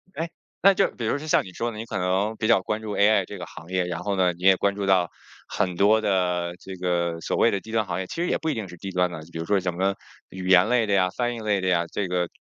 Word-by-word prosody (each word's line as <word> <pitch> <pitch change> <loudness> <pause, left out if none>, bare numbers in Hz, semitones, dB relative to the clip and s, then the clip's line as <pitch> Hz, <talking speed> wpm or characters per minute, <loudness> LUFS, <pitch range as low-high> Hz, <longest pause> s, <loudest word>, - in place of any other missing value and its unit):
哎， 165 +1 -3 0.3
那 195 +1 +7
就 195 - +3
是 - - -10
比 115 - -4
如 110 - +1
像 155 +1 +1
你 95 - -11
说 115 +5 -2
的 110 - -9
你 110 - -5
可 110 - -4
能 95 +4 0
比 110 - -1
较 115 -4 +5
关 105 +3 -3
注 110 -1 -5
AI 100 -1 +4
这 100 - -8
个 90 - -6
行 80 +3 -12
业， 90 -1 0
然 85 -1 -4
后 100 -1 -1
呢， 90 -2 +2
你 85 +1 -14
也 95 0 +7
关 100 +1 0
注 100 -1 -3
到 95 -3 +3 0.4
很 90 -2 -1
多 105 +4 +4
的 90 -4 0
这 95 +1 -8
个 85 -2 -1
所 - - -2
谓 - - +4
的 100 - -1
低 110 - -12
端 110 -1 +1
行 90 -1 -3
业， 95 - -4
其 - - -7
实 175 - 0
也 - - +1
不 160 - -3
一 - - +1
定 110 -5 -4
是 90 - -11
低 95 +3 -6
端 90 -1 +1
的， 85 - -6
比 80 - -6
如 80 - -3
说 100 +1 +2
什 90 -1 -2
么 95 +3 0 0.3
语 95 0 -7
言 90 0 +6
类 120 -2 +3
的 100 - 0
呀、 95 -2 +3
翻 120 -1 0
译 - - -6
类 105 -2 0
的 95 - -2
呀， 85 -2 +2
这 100 - -2
个 90 -1 -1
95 Hz, 340 characters per minute, -25 LUFS, 90-110 Hz, 0.4 s, 那